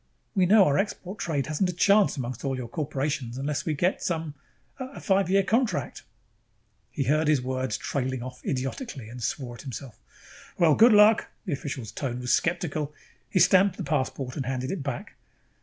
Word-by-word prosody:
We 190 -4 +3
know 205 0 +7
our 140 - +2
export 195 -1 -3
trade 145 -5 -1
hasn't 155 +5 0
a - - -2
chance 200 +1 +4
among 125 -1 -3
all 135 -2 -1
your 125 -2 -5
corporations 140 -2 -3
unless 140 +3 -2
we 155 - +1
get 180 +6 0
some 160 -3 -2 0.5
a 260 +1 -7
five 195 -3 +1
year 195 +1 +4
contract...?" 230 +4 0 0.9
He 145 - -2
heard 150 +4 +2
his 150 -2 +4
words 130 -2 -2
trailing 130 -2 -2
off 125 0 -9
idiotically, 135 - -4
and 120 +1 -9
swore 125 +1 -3
at 120 - -10
himself. 125 -3 -8 0.6
"Well, 165 -4 +5
good 230 +9 +7
luck." 210 +1 +6 0.2
The 180 - -2
official's 130 -5 -5
tone 125 -3 -4
was 125 -1 0
skeptical. 160 -4 0 0.4
He - - -1
stamped 190 +1 +5
the 190 - -4
passport 135 -3 -2
and 135 -4 -3
handed 130 0 -2
it 190 - -3
back. 140 0 -5
145 Hz, 180 wpm, -26 LUFS, 130-185 Hz, 0.9 s, know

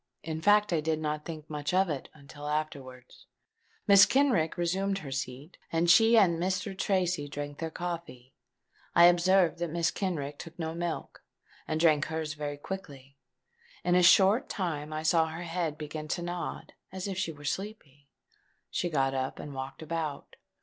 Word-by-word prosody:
In 160 0 -4
fact 205 +1 +4
I 160 - +2
did 160 0 0
not 150 -1 -3
think 155 -2 -7
much 150 +3 -3
of 190 +1 +4
it, 145 -5 -4
until 145 0 -10
afterwards. 140 -5 -5 0.6
Mrs. 200 0 +8
Kenrick 240 - +2
resumed 190 +3 0
her 145 -8 -7
seat; 135 +4 -6
and 170 +1 +3
she 225 +6 +6
and 175 -6 +4
Mr. 190 +2 -1
Tracy 180 -6 0
drank 145 0 -6
their 165 - -3
coffee. 165 -7 -6 0.6
I 170 - +8
observed 175 0 +4
that 175 -1 -2
Mrs. 170 +2 0
Kenrick 150 -7 -3
took 165 0 -10
no 160 -2 -3
milk, 170 0 -4 0.5
and 155 - -1
drank 155 -3 +4
hers 160 -1 -3
very 145 -1 -5
quickly. 145 -6 -8 0.7
In 175 - +2
a 180 - +5
short 190 +6 +5
time 155 -6 -3
I 155 0 -4
saw 160 0 +3
her 160 +2 -6
head 165 -3 -2
begin 155 0 -6
to 175 +3 -2
nod 175 0 -5 0.2
as 190 +1 -5
if 195 - -3
she 165 - -1
was 145 -2 -3
sleepy: 150 -9 -8 0.6
she 175 - -1
got 135 -4 +1
up, 130 0 -2
and 145 - -8
walked 135 +3 -6
about. 155 -3 -4
160 Hz, 170 wpm, -29 LUFS, 150-180 Hz, 0.7 s, Mrs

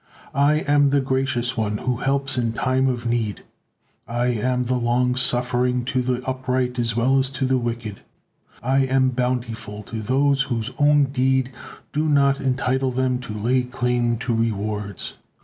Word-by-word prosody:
I 145 +2 +3
am 145 -1 +3
the 140 +1 +3
Gracious 130 -2 0
One 105 -2 -1
who 125 +1 -2
helps 135 +1 0
in 115 -3 0
time 130 +3 +1
of 125 -2 -2
need. 115 -4 -1 0.6
I 120 +1 0
am 125 +2 0
the 125 +1 -1
Long 125 +1 +1
Suffering 125 0 +1
to 130 0 0
the 125 0 -2
upright 130 -1 -1
as 115 -2 0
well 130 +3 +3
as 130 0 0
to 135 0 -2
the 130 0 +2
wicked. 115 -3 -4 0.6
I 130 +3 +2
am 130 0 +2
Bountiful 120 -4 -3
to 110 +1 -6
those 135 +4 +2
whose 120 -3 -2
own 145 0 +5
deed 130 -1 +1 0.4
do 150 +2 0
not 140 -2 +3
entitle 130 0 0
them 130 0 0
to 125 -3 -8
lay 120 +5 +1
claim 125 -1 0
to 120 - 0
rewards. 105 -3 -2
125 Hz, 165 wpm, -22 LUFS, 120-130 Hz, 0.6 s, own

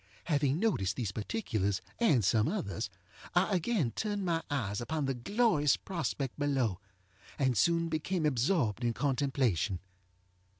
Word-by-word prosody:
Having 145 -3 +1
noticed 135 - +1
these 115 -6 -2
particulars, 105 - -1 0.2
and 145 - +4
some 105 +3 +3
others, 100 - -2 0.5
I 190 +2 +3
again 175 - +1
turned 205 - -2
my 165 -2 +1
eyes 110 -9 -1
upon 150 +4 -2
the 135 - 0
glorious 150 - +2
prospect 150 -7 -3
below, 130 -10 +1 0.6
and 130 -3 +2
soon 170 - +3
became 160 +2 -1
absorbed 130 - +1
in 120 -1 +1
contemplation. 130 - 0
140 Hz, 130 wpm, -32 LUFS, 115-170 Hz, 0.6 s, and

